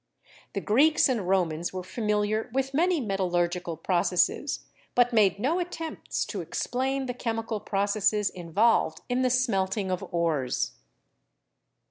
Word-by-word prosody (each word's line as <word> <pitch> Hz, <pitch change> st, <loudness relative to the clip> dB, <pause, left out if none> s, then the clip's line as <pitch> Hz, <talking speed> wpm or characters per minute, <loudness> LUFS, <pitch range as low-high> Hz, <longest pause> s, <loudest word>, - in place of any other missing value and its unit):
The -, -, -2 dB
Greeks 285 Hz, +9 st, +4 dB
and 225 Hz, -9 st, -1 dB
Romans 175 Hz, -3 st, +1 dB
were 185 Hz, -1 st, -5 dB
familiar 210 Hz, +1 st, -1 dB
with 270 Hz, +2 st, -1 dB
many 340 Hz, +3 st, +2 dB
metallurgical 175 Hz, -, -1 dB
processes, 180 Hz, -, +1 dB, 0.3 s
but 245 Hz, 0 st, +4 dB
made 205 Hz, -4 st, +4 dB
no 285 Hz, -, 0 dB
attempts 330 Hz, -2 st, -4 dB
to -, -, -4 dB
explain 265 Hz, +2 st, -2 dB
the 250 Hz, -, -3 dB
chemical 225 Hz, -2 st, -3 dB
processes 205 Hz, 0 st, +1 dB
involved 185 Hz, +6 st, +1 dB
in 250 Hz, +1 st, +1 dB
the 255 Hz, -, +3 dB
smelting 200 Hz, -6 st, 0 dB
of 185 Hz, -, -1 dB
ores. 160 Hz, -7 st, 0 dB
210 Hz, 125 wpm, -27 LUFS, 185-255 Hz, 0.3 s, Greeks